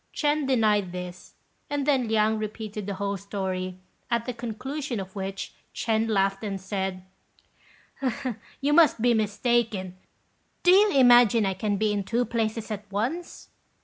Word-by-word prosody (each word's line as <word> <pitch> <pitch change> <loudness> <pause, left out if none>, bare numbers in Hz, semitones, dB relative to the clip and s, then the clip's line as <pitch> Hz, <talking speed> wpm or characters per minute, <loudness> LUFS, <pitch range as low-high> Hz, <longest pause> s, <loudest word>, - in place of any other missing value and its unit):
Ch'ên 295 -1 +1
denied 210 -7 +2
this, 180 0 -8 0.3
and 290 -1 -1
then 270 -5 +2
Liang 220 0 +2
repeated 215 -1 -5
the 200 - -3
whole 200 +1 -2
story, 190 -2 -4 0.3
at 235 -1 0
the 250 - -3
conclusion 245 +3 -4
of 190 0 -8
which, 195 0 -5 0.2
Ch'ên 225 0 0
laughed, 195 -1 +1
and 200 -2 -3
said, 190 -1 -3 1.6
"You 285 +2 +2
must 315 -6 +5
be 240 +1 +3
mistaken. 215 -3 0 0.7
Do 360 - +6
you 405 +2 +6
imagine 240 -4 +6
I 195 - 0
can 205 +2 -1
be 215 0 +1
in 200 -1 -1
two 235 +5 0
places 225 -1 -2
at 205 -1 -6
once?" 260 - -3
215 Hz, 145 wpm, -26 LUFS, 195-245 Hz, 1.6 s, Do